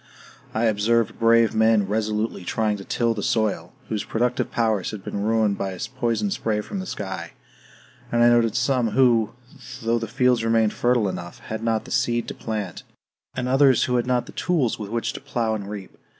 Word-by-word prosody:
I 110 Hz, -, -1 dB
observed 115 Hz, +1 st, +1 dB
brave 115 Hz, 0 st, +4 dB
men 110 Hz, -2 st, +4 dB
resolutely 105 Hz, -1 st, -1 dB
trying 105 Hz, +3 st, 0 dB
to 100 Hz, -, -8 dB
till 115 Hz, +3 st, 0 dB
the 105 Hz, -, -4 dB
soil, 100 Hz, -6 st, 0 dB, 0.2 s
whose 105 Hz, -2 st, -2 dB
productive 125 Hz, +2 st, -1 dB
powers 110 Hz, -5 st, 0 dB
had 105 Hz, -3 st, -7 dB
been 100 Hz, -, -4 dB
ruined 110 Hz, -1 st, +1 dB
by 95 Hz, -1 st, -2 dB
a 90 Hz, -, -9 dB, 0.2 s
poison 125 Hz, -, 0 dB
spray 110 Hz, -, -1 dB
from 195 Hz, -, -6 dB
the 190 Hz, -, -5 dB
sky; 95 Hz, -, -5 dB, 0.8 s
and 120 Hz, 0 st, +3 dB
I 120 Hz, -, +7 dB
noted 120 Hz, -2 st, +3 dB
some 125 Hz, -2 st, +1 dB
who, 115 Hz, -4 st, +3 dB, 0.5 s
though 115 Hz, +1 st, +1 dB
the 115 Hz, -, -4 dB
fields 125 Hz, +1 st, +2 dB
remained 115 Hz, -1 st, +2 dB
fertile 120 Hz, -3 st, +2 dB
enough, 85 Hz, -2 st, -6 dB
had 110 Hz, 0 st, -6 dB
not 115 Hz, -1 st, 0 dB
the -, -, -11 dB
seed 120 Hz, -2 st, +1 dB
to -, -, -4 dB
plant; 105 Hz, -5 st, -4 dB, 0.5 s
and 125 Hz, -1 st, -2 dB
others 135 Hz, -1 st, +4 dB
who 125 Hz, -1 st, +1 dB
had 120 Hz, -, -1 dB
not 125 Hz, -1 st, +1 dB
the -, -, -11 dB
tools 150 Hz, -12 st, 0 dB
with 105 Hz, -2 st, -5 dB
which 115 Hz, +1 st, -2 dB
to -, -, -8 dB
plow 115 Hz, -2 st, -1 dB
and 100 Hz, -2 st, -4 dB
reap. 100 Hz, -2 st, -8 dB
115 Hz, 195 wpm, -23 LUFS, 105-120 Hz, 0.8 s, I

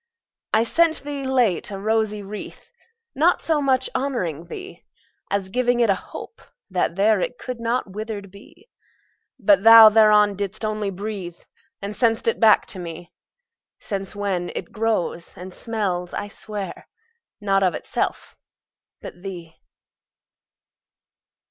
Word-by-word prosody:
I 220 Hz, -, +4 dB
sent 325 Hz, +7 st, +2 dB
thee, 285 Hz, -1 st, -5 dB
late, 250 Hz, -9 st, +1 dB
a 200 Hz, -, -5 dB
rosy 215 Hz, 0 st, 0 dB
wreath, 205 Hz, +2 st, -9 dB, 0.4 s
Not 330 Hz, +6 st, +3 dB
so 315 Hz, -2 st, 0 dB
much 265 Hz, -2 st, +2 dB
honouring 180 Hz, -, -2 dB
thee, 375 Hz, -, -9 dB, 0.5 s
As 200 Hz, -2 st, -1 dB
giving 245 Hz, +2 st, +1 dB
it 230 Hz, -4 st, +4 dB
a 190 Hz, -, -3 dB
hope, -, -, -9 dB, 0.3 s
that 180 Hz, -2 st, 0 dB
there 205 Hz, +1 st, +3 dB
It 250 Hz, -, -3 dB
could 250 Hz, -1 st, -6 dB
not 230 Hz, -3 st, -1 dB
withered 205 Hz, -1 st, -6 dB
be. 335 Hz, -, -17 dB, 0.7 s
But 205 Hz, -5 st, +4 dB
thou 225 Hz, 0 st, +10 dB
thereon 210 Hz, -1 st, +5 dB
didst 200 Hz, +2 st, -4 dB
only 215 Hz, -1 st, -2 dB
breathe, 195 Hz, -3 st, -6 dB, 0.5 s
And 200 Hz, +1 st, -4 dB
sent'st 230 Hz, -1 st, +1 dB
back 220 Hz, -2 st, +5 dB
to 190 Hz, -, -8 dB
me: 170 Hz, 0 st, -8 dB, 0.7 s
Since 195 Hz, -2 st, -5 dB
when 195 Hz, -4 st, -2 dB
it -, -, -5 dB
grows, 215 Hz, -6 st, -2 dB
and 185 Hz, +1 st, -9 dB
smells, 190 Hz, -7 st, -3 dB
I 205 Hz, -, -4 dB
swear, 205 Hz, -1 st, -7 dB, 0.5 s
Not 195 Hz, -2 st, +1 dB
of 185 Hz, -4 st, +2 dB
itself, -, -, -3 dB, 0.7 s
but 175 Hz, -, -9 dB
thee. 175 Hz, -4 st, -8 dB
210 Hz, 135 wpm, -22 LUFS, 190-230 Hz, 0.7 s, thou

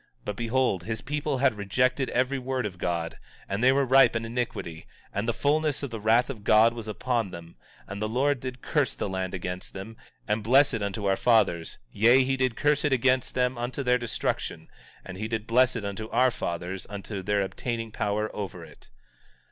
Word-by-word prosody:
But 105 Hz, -, -3 dB
behold, 115 Hz, -3 st, 0 dB
this 110 Hz, -1 st, -2 dB
people 150 Hz, +1 st, -2 dB
had 130 Hz, -1 st, +3 dB
rejected 125 Hz, +6 st, 0 dB
every 130 Hz, +2 st, 0 dB
word 130 Hz, -1 st, -2 dB
of 95 Hz, -3 st, -6 dB
God, 85 Hz, -2 st, -2 dB, 0.3 s
and 100 Hz, +4 st, -2 dB
they 130 Hz, -, +7 dB
were 135 Hz, +1 st, +2 dB
ripe 130 Hz, -1 st, +5 dB
in 110 Hz, 0 st, -1 dB
iniquity; 115 Hz, -9 st, -4 dB, 0.3 s
and 100 Hz, +3 st, -2 dB
the -, -, +4 dB
fulness 145 Hz, +4 st, 0 dB
of 140 Hz, -, -4 dB
the 115 Hz, -, -5 dB
wrath 115 Hz, +3 st, +3 dB
of 115 Hz, -7 st, -7 dB
God 110 Hz, +2 st, +5 dB
was 115 Hz, -2 st, -7 dB
upon 115 Hz, 0 st, -1 dB
them; 85 Hz, -1 st, -10 dB, 0.3 s
and 100 Hz, +1 st, -7 dB
the 110 Hz, -, -1 dB
Lord 135 Hz, +4 st, +1 dB
did 125 Hz, 0 st, -7 dB
curse 145 Hz, -5 st, 0 dB
the -, -, -3 dB
land 95 Hz, -1 st, -3 dB
against 90 Hz, 0 st, -5 dB
them, 100 Hz, +4 st, -8 dB, 0.3 s
and 105 Hz, +1 st, 0 dB
bless 135 Hz, +6 st, +4 dB
it 110 Hz, -, -2 dB
unto 100 Hz, +1 st, -3 dB
our 95 Hz, -1 st, +3 dB
fathers; 95 Hz, -8 st, +2 dB
yea, 120 Hz, +5 st, +5 dB
he 135 Hz, +1 st, 0 dB
did 130 Hz, -3 st, 0 dB
curse 150 Hz, 0 st, +2 dB
it 150 Hz, -, +1 dB
against 130 Hz, 0 st, +2 dB
them 125 Hz, -1 st, +1 dB
unto 125 Hz, +3 st, -3 dB
their 125 Hz, -1 st, +3 dB
destruction, 120 Hz, -2 st, -3 dB, 0.4 s
and 95 Hz, 0 st, -8 dB
he 110 Hz, -, -2 dB
did 110 Hz, -1 st, -3 dB
bless 125 Hz, +2 st, +3 dB
it 115 Hz, -4 st, -4 dB
unto 100 Hz, +2 st, -5 dB
our 130 Hz, 0 st, +3 dB
fathers 90 Hz, -2 st, -4 dB
unto 100 Hz, 0 st, -5 dB
their 100 Hz, +1 st, +1 dB
obtaining 115 Hz, +3 st, -4 dB
power 105 Hz, +1 st, -2 dB
over 90 Hz, -4 st, -5 dB
it. 75 Hz, -2 st, -17 dB
115 Hz, 205 wpm, -27 LUFS, 100-130 Hz, 0.4 s, they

